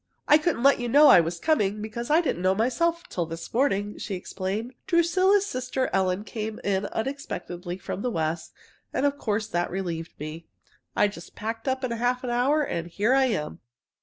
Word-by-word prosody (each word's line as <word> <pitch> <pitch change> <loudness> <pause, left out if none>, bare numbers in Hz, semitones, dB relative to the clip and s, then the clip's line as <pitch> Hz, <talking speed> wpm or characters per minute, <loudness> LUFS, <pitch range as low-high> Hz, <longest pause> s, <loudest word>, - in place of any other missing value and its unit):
"I 300 - +7
couldn't 305 -6 0
let 275 -1 +5
you 240 -1 -2
know 290 +4 +7
I - - +9
was 170 +1 -1
coming, 215 -10 +1
because 220 +3 -5
I 315 +3 +5
didn't 260 - -2
know 185 +1 +3
myself 330 - +1
till 175 -3 -3
this 165 +1 -7
morning," 210 -5 0
she 200 - -4
explained. 195 +6 -4
"Drusilla's 370 +3 +3
sister 255 -4 -2
Ellen 190 +1 +1
came 215 +1 -5
in 200 0 0
unexpectedly 180 -8 -4
from 190 - -5
the 250 - 0
West, 160 -4 -2 0.4
and 280 - 0
of 285 0 0
course 215 -1 -1
that 175 +1 -1
relieved 170 -3 -4
me. 155 +2 -7 0.5
I - - +4
just 175 -4 -10
packed 225 +3 -5
up 260 0 0
in 255 - -1
half 245 +2 0
an 245 - -2
hour, 275 +6 +2
and 170 -11 -3
here 205 +8 +1
I 270 0 +4
am. 150 - -2
220 Hz, 190 wpm, -26 LUFS, 185-265 Hz, 0.5 s, I